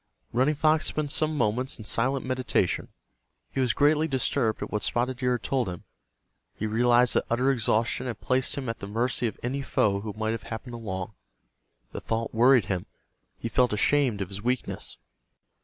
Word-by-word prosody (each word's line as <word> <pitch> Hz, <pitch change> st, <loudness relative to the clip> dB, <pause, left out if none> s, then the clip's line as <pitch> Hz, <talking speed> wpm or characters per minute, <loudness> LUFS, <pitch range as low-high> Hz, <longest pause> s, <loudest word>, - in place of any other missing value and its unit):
Running 130 Hz, +6 st, +3 dB
Fox 155 Hz, +1 st, +2 dB
spent 150 Hz, -2 st, -2 dB
some 155 Hz, 0 st, 0 dB
moments 125 Hz, +3 st, 0 dB
in 110 Hz, -, -9 dB
silent 130 Hz, +5 st, 0 dB
meditation. 130 Hz, -9 st, 0 dB, 0.6 s
He -, -, -3 dB
was 125 Hz, -2 st, +3 dB
greatly 150 Hz, +2 st, +3 dB
disturbed 130 Hz, -4 st, 0 dB
at -, -, -7 dB
what 105 Hz, -, -1 dB
Spotted 125 Hz, +1 st, 0 dB
Deer 125 Hz, -1 st, +1 dB
had 120 Hz, -, -3 dB
told 130 Hz, -7 st, 0 dB
him. 90 Hz, -2 st, -7 dB, 0.7 s
He 110 Hz, -, -3 dB
realized 120 Hz, +2 st, +3 dB
that -, -, +1 dB
utter 125 Hz, +3 st, +2 dB
exhaustion 115 Hz, 0 st, 0 dB
had 120 Hz, -4 st, -4 dB
placed 130 Hz, 0 st, +1 dB
him 135 Hz, -2 st, -3 dB
at 115 Hz, -, -3 dB
the 100 Hz, -, -6 dB
mercy 120 Hz, +3 st, 0 dB
of 110 Hz, -, -5 dB
any 135 Hz, +3 st, -2 dB
foe 100 Hz, -7 st, +1 dB
who 105 Hz, 0 st, -5 dB
might 110 Hz, 0 st, 0 dB
have 115 Hz, -1 st, -3 dB
happened 120 Hz, +2 st, -6 dB
along. 95 Hz, -4 st, -5 dB, 0.8 s
The -, -, -6 dB
thought 115 Hz, 0 st, -2 dB
worried 120 Hz, -1 st, +5 dB
him. 95 Hz, -2 st, -3 dB, 0.5 s
He -, -, -4 dB
felt 125 Hz, 0 st, +2 dB
ashamed 120 Hz, -1 st, +2 dB
of 95 Hz, -, -3 dB
his 100 Hz, 0 st, -6 dB
weakness. 125 Hz, +3 st, -2 dB
120 Hz, 185 wpm, -27 LUFS, 110-130 Hz, 0.8 s, worried